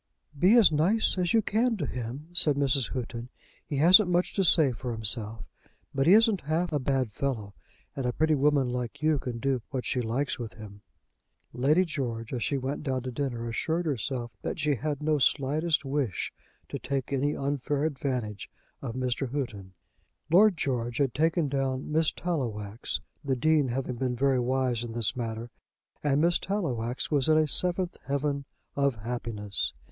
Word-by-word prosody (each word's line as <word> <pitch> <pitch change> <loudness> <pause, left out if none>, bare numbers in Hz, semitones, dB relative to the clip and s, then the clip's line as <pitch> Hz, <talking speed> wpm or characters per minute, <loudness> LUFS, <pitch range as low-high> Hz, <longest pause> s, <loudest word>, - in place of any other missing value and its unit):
"Be 185 +10 +5
as 220 -8 +7
nice 175 +9 +2
as 175 -1 +1
you 225 -1 +4
can 225 +3 +1
to 155 - -2
him," 125 +5 -6
said 155 -4 +5
Mrs. 135 -2 +1
Houghton. 120 -1 -5 0.3
"He 145 - -4
hasn't 180 +6 +7
much 175 0 +1
to 195 - +1
say 160 -6 +5
for 120 0 -5
himself, 110 -1 -2 0.5
but 135 +2 +1
he 180 - +8
isn't 220 -3 +5
half 160 +3 -1
a 145 - +2
bad 130 -3 0
fellow; 110 -5 -3 0.4
and 135 -3 -2
a - - +1
pretty 155 +5 +2
woman 145 -2 +3
like 125 +2 -4
you 155 -2 +3
can 125 -2 -5
do 130 0 0
what 130 -3 -3
she 125 - 0
likes 125 +4 -2
with 115 -2 -6
him." 105 -2 -11 0.7
Lady 145 +9 +3
George, 120 -8 -4
as 125 - -2
she 140 - 0
went 135 +2 -3
down 130 -4 -2
to 130 - -4
dinner, 120 -3 -3
assured 160 +9 -1
herself 125 -4 -2
that - - -3
she 150 -1 +1
had 145 +2 -3
no 155 -1 +2
slightest 150 +3 +1
wish 135 -8 -2 0.3
to - - -5
take 140 -1 -3
any 140 +2 0
unfair 140 +1 -1
advantage 125 - -3 0.3
of 120 -3 -5
Mr. 130 0 -2
Houghton. 105 -10 -5 0.6
Lord 195 +1 +6
George 120 -4 -2
had 135 -4 +1
taken 160 +1 +1
down 135 0 -2
Miss 160 0 +3
Tallowax, 115 - -3 0.2
the 135 -2 0
Dean 150 +2 +3
having 125 0 -3
been 125 0 -1
very 135 +1 +2
wise 125 -1 0
in 115 -1 -6
this 115 +2 0
matter; 115 -1 -4 0.5
and 145 -1 +2
Miss 170 +1 +3
Tallowax 130 - -2
was 145 -1 +3
in 155 - +5
a 155 -1 +3
seventh 180 +3 +1
heaven 140 0 -1 0.3
of 140 -2 +2
happiness. 110 -2 -4
135 Hz, 175 wpm, -28 LUFS, 120-155 Hz, 0.7 s, he